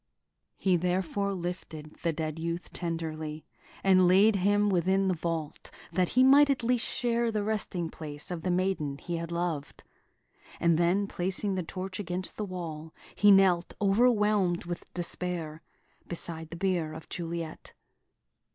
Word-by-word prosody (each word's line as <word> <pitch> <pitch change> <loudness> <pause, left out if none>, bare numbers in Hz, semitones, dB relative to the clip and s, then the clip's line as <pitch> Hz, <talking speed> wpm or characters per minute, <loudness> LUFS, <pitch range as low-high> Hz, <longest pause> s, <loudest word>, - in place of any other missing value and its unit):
He 185 -2 +2
therefore 185 +3 0
lifted 170 -4 -6
the 170 - +1
dead 155 0 -4
youth 170 +1 -4
tenderly, 160 -2 -4 0.4
and 185 -2 +5
laid 200 +4 +5
him 205 +2 +3
within 190 +1 +2
the 185 - +2
vault, 165 -2 -4 0.2
that 180 +1 +1
he 255 - +8
might 280 +2 +7
at 270 -3 +1
least 240 0 +1
share 235 -2 0
the 210 -2 -1
resting 200 -5 -1
place 150 0 -7
of 175 -2 -4
the 185 - -2
maiden 175 -6 0
he 170 +3 -4
had 165 0 -5
loved; 170 -4 -3 0.8
and 170 -1 +3
then, 180 +4 +2
placing 190 +1 -1
the 185 - -1
torch 185 +2 -6
against 180 -1 -3
the 210 - -3
wall, 165 -4 -6 0.2
he 205 - +4
knelt, 190 -3 +5
overwhelmed 210 -4 +3
with 175 0 -6
despair, 170 -3 -2 0.5
beside 165 -2 -5
the 170 - -7
bier 175 -4 0
of 160 0 -9
Juliet. 165 -2 -5
180 Hz, 150 wpm, -29 LUFS, 165-195 Hz, 0.8 s, he